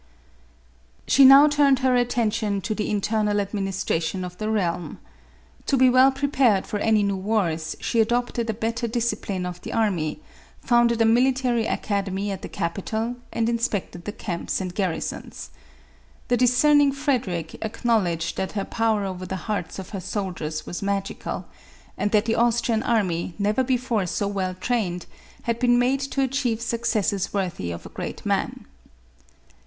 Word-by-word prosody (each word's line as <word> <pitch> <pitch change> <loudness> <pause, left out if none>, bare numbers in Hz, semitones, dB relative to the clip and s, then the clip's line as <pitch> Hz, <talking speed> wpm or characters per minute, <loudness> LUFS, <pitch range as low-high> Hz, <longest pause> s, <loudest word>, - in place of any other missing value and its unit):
She 275 - +5
now 275 +3 +9
turned 290 -2 +4
her 255 -1 +4
attention 225 -4 0
to 215 - -2
the 210 - -2
internal 210 0 0
admin 200 -1 -1
istration 185 -1 -2
of 180 0 -8
the 215 0 -2
realm. 180 -5 -1 0.7
To 275 - +2
be 255 0 +5
well 260 +2 +6
prepared 265 -7 +2
for 210 - -3
any 215 -1 +3
new 200 -1 0
wars, 180 -6 -1
she 235 - -1
adopted 235 0 0
a - - +1
better 230 +2 -2
discipline 215 -5 -2
of 180 -1 -6
the - - -7
army, 190 - 0 0.4
founded 235 -2 +3
a - - +3
military 245 0 +2
academy 200 0 -2
at 190 -1 -5
the - - -7
capital, 220 +7 -3
and 225 -1 0
inspect 235 -5 -1
ed 175 - -10
the 210 - -3
camps 180 -5 -3
and 185 -2 -4
garrisons. 170 - -4 0.8
The 245 - +4
discerning 275 +4 +4
Frederic 235 - -2
acknowledged 210 -7 0
that 190 - -2
her 200 -2 -2
power 220 -3 0
over 185 -1 -5
the 190 - -3
hearts 205 -6 -3
of 190 - -7
her 195 -3 -5
soldiers 175 -6 -4
was 175 - -5
magical, 200 0 -3 0.5
and 205 - 0
that 210 0 +2
the 225 - +1
Austrian 235 -1 +2
army, 180 -8 0
never 210 +5 +1
before 245 -6 0
so 200 +4 -1
well 190 -2 -2
trained, 185 -4 -2 0.4
had 235 0 -1
been 245 -1 +4
made 255 +3 +2
to 275 0 -1
achieve 260 -4 0
successes 230 -4 -1
worthy 175 - -2
of 85 0 -6
a - - -8
great - - -7
man. - - -1
215 Hz, 160 wpm, -24 LUFS, 190-240 Hz, 0.8 s, now